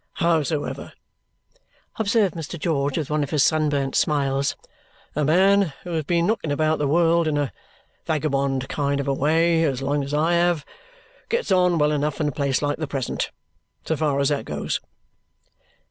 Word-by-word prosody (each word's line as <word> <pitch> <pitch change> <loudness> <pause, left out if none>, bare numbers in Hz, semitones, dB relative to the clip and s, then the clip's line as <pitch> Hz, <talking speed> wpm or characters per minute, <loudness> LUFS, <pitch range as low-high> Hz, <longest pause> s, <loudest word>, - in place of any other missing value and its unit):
Howsoever," 160 -3 -1 1.1
observed 205 -4 +2
Mr. 165 +1 -6
George 145 -4 0
with 155 -3 -3
one 150 0 +1
of 145 - -2
his 145 -2 +2
sunburnt 145 -4 +1
smiles, 140 -2 +1 0.6
"a 150 - +1
man 190 +2 +3
who 180 - -7
has 160 -3 -2
been 170 +1 +1
knocking 195 -7 -1
about 155 +2 +1
the 145 - +1
world 165 +2 +3
in 150 -1 0
a 145 -3 -1 0.5
vagabond 140 -4 0
kind 140 -1 -1
of 140 - -3
a 140 - +2
way 165 +4 +2
as 135 -4 -1
long 140 +1 0
as 140 - -6
I 155 +3 +2
have 170 -3 +2 0.6
gets 475 0 -1
on 180 -2 +4
well 150 -1 +3
enough 150 0 -1
in 150 - +1
a - - -3
place 140 0 -1
like 145 +1 -1
the 155 - -2
present, 135 -3 -3 0.6
so 160 - 0
far 150 -2 0
as 140 - +2
that 145 -1 -1
goes." - - -3
150 Hz, 175 wpm, -23 LUFS, 140-165 Hz, 1.1 s, on